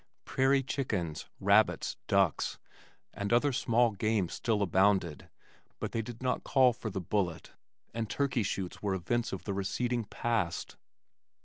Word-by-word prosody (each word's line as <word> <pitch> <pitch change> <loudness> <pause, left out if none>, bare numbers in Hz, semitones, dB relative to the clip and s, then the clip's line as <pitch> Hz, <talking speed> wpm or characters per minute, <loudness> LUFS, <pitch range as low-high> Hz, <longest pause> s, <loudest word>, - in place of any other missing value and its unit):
Prairie 135 +1 +2
chickens, 105 - -3
rabbits, - - +3
ducks, - - +2 0.6
and 100 +1 -3
other 130 +4 +3
small 120 -2 +3
game 105 -3 0
still 110 -4 0
abounded 95 -4 +2 0.5
but - - -3
they 115 - -1
did 115 +2 -8
not 125 -1 0
call 130 -3 +4
for 115 - -5
the 95 - -3
bullet, 90 -2 -2 0.4
and 115 -2 -3
turkey 140 -3 0
shoots 95 -3 -3
were 100 -2 0
events 120 +7 -1
of - - -5
the 100 - -3
receding 115 +5 -1
past. 105 -5 -2
110 Hz, 140 wpm, -31 LUFS, 95-120 Hz, 0.6 s, call